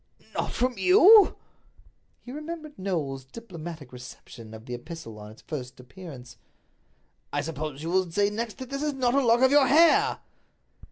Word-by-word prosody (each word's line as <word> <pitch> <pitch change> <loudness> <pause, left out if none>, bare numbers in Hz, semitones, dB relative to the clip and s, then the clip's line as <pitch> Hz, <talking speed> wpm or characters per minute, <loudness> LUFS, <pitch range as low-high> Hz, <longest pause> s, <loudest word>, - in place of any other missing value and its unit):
"Not - - -2
from 250 -3 -1
you?" 365 - +7 0.8
He 245 - -11
remembered 305 - -8
Knowles's 155 -9 -3
diplomatic 170 - -9
reception 120 -2 -11
of 110 +1 -12
the 125 - -7
epistle 120 -4 -8
on 105 0 -10
its 110 - -16
first 130 -5 -7
appearance. 125 -4 -12 0.9
"I 145 - -1
suppose 155 0 -5
that 145 - -10
you 165 - -3
will 185 -1 +1
say 205 +3 +1
next 225 +1 -4
that 260 0 -9
this 275 0 -3
is 300 -1 -1
not 250 -2 0
a 280 0 +3
lock 235 0 +3
of 260 0 +5
your 285 -2 +5
hair?" 320 +5 +4
180 Hz, 170 wpm, -26 LUFS, -, 0.9 s, you